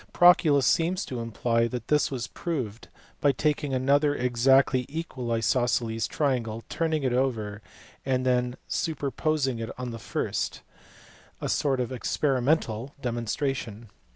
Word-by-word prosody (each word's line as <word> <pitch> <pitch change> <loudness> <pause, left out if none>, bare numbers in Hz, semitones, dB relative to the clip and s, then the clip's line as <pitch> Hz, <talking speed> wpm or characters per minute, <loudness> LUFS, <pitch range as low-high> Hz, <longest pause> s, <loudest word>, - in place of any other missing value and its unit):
Proclus 160 -6 +6
seems 175 +3 +2
to 125 - -5
imply 115 +1 0
that 120 -1 -5
this 150 0 +3
was 125 -4 -3
proved 125 -11 -4 0.3
by 145 - +4
taking 145 +1 0
another 140 +3 +2
exactly 125 +1 +3
equal 140 -6 -4
isosceles 115 0 +1
triangle, 120 -6 -1
turning 160 -2 0
it 130 -2 +1
over, 110 -5 -1 0.4
and 130 -1 0
then 125 -1 +1
superposing 145 -4 -1
it 115 0 -4
on 125 -1 -4
the 115 - -7
first; - - -3 0.8
a - - -3
sort 135 -3 +1
of 125 -1 -2
experimental 130 -1 0
demonstration. 120 -2 -3
130 Hz, 125 wpm, -27 LUFS, 115-145 Hz, 0.8 s, Proclus